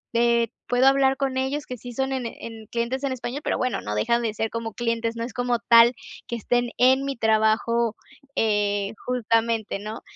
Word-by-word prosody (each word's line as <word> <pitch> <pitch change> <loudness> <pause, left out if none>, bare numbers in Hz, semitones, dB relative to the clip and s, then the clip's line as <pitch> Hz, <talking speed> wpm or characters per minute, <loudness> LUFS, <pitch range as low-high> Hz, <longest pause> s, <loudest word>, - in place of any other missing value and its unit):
eh, 235 -1 +3 0.2
puedo 245 +1 +3
hablar 270 0 +4
con 270 -2 -1
ellos, 280 +3 -1
que 250 - -7
sí 245 +2 -9
son, 265 +2 -1
en 260 -2 -2
en 225 -1 -9
clientes 240 +4 -2
en 275 - 0
español, 260 +2 -4
pero - - 0
bueno, 255 -1 -1
no 105 - -4
dejan 235 - +1
de 225 -2 -2
ser, 225 +1 -2
como 230 -1 -4
clientes. 230 0 -1
No 230 - -3
es 235 0 -6
como 245 0 0
tal 235 +1 +6 0.3
que 235 - -3
estén 240 +2 0
en 260 +2 +4
mi 275 - -2
trabajo, 220 +1 +2 0.4
eh, 205 -1 +1
justamente, 230 -3 0
¿no? 215 +2 -7
235 Hz, 195 wpm, -24 LUFS, 225-255 Hz, 0.4 s, tal